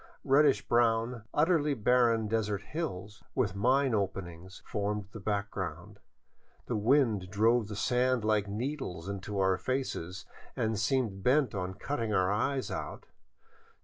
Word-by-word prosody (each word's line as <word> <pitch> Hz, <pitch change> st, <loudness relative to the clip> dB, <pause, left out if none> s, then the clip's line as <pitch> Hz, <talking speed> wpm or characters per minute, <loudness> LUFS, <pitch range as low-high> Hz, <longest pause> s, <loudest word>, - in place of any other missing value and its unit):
Reddish 140 Hz, 0 st, +4 dB
brown, 115 Hz, 0 st, +1 dB
utterly 150 Hz, -2 st, +2 dB
barren 115 Hz, -1 st, +3 dB
desert 105 Hz, -2 st, -1 dB
hills, 105 Hz, -, -5 dB
with 115 Hz, -8 st, +1 dB
mine 130 Hz, +5 st, +2 dB
openings, 95 Hz, -3 st, -4 dB
formed 105 Hz, -2 st, -2 dB
the 110 Hz, -, -8 dB
background. 100 Hz, -1 st, -4 dB, 0.7 s
The 120 Hz, -, -2 dB
wind 110 Hz, -4 st, +2 dB
drove 110 Hz, +3 st, +2 dB
the 105 Hz, -, -6 dB
sand 125 Hz, +1 st, +1 dB
like 105 Hz, -2 st, +2 dB
needles 105 Hz, -, -4 dB
into 100 Hz, +1 st, -5 dB
our 95 Hz, -1 st, +2 dB
faces 95 Hz, -9 st, -3 dB, 0.3 s
and 110 Hz, -2 st, -1 dB
seemed 110 Hz, -4 st, 0 dB
bent 130 Hz, +4 st, +3 dB
on 95 Hz, -1 st, -3 dB
cutting 115 Hz, 0 st, -2 dB
our 95 Hz, +1 st, +2 dB
eyes 130 Hz, +6 st, -1 dB
out. -, -, -5 dB
110 Hz, 130 wpm, -30 LUFS, 100-125 Hz, 0.7 s, Reddish